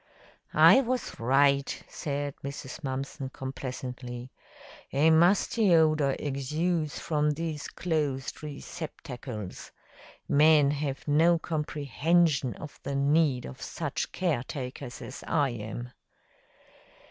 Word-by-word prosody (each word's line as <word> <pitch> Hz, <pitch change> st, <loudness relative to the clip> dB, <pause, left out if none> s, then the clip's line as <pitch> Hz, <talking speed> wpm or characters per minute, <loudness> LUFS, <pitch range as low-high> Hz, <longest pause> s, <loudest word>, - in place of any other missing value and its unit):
"I 265 Hz, -, +8 dB
was 255 Hz, -1 st, -3 dB
right," 140 Hz, +3 st, +2 dB
said 145 Hz, -2 st, -3 dB
Mrs. 140 Hz, +2 st, -7 dB
Mumpson 135 Hz, 0 st, -4 dB
complacently. 130 Hz, -2 st, -6 dB, 0.6 s
"A 150 Hz, +4 st, +4 dB
musty 180 Hz, +4 st, +4 dB
odor 155 Hz, -4 st, +3 dB
exudes 150 Hz, +3 st, -1 dB
from 150 Hz, -2 st, 0 dB
these 155 Hz, 0 st, -3 dB
closed 150 Hz, -6 st, -2 dB
receptercles. 140 Hz, -, -7 dB, 0.6 s
Men 150 Hz, -1 st, +5 dB
have 145 Hz, -1 st, -3 dB
no 165 Hz, +4 st, +5 dB
comprehension 150 Hz, -2 st, +1 dB
of 150 Hz, -, -10 dB
the 140 Hz, -, -3 dB
need 140 Hz, -2 st, +2 dB
of 65 Hz, -, -9 dB
such -, -, -3 dB
caretakers 130 Hz, -5 st, -3 dB
as 130 Hz, -, -8 dB
I 145 Hz, -4 st, +2 dB
am." 120 Hz, +2 st, -6 dB
145 Hz, 100 wpm, -28 LUFS, 130-160 Hz, 0.6 s, I